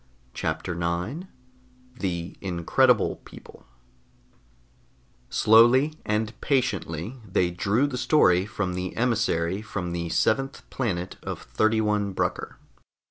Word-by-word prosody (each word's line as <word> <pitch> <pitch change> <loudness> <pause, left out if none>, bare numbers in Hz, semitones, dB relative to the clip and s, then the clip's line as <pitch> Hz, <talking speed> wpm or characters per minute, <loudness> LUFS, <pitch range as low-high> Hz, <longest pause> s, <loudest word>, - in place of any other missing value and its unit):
CHAPTER 80 +3 -3
9 90 - -3 0.7
THE 85 -2 -3
INCREDIBLE 100 +7 +2
PEOPLE - - -15 1.6
Slowly 120 +7 +5
and 110 +1 -2
patiently 115 - -1
they 90 -3 0
drew 100 +9 +1
the 130 -3 -3
story 95 - +4
from 100 -3 -3
the 90 0 -4
emissary 105 -6 0
from 95 -5 -4
the 85 -1 -3
seventh 135 +10 0
planet 95 -8 -3
of - - -6
31 105 - +1
Brucker. - - -2
100 Hz, 100 wpm, -25 LUFS, 90-120 Hz, 1.6 s, Slowly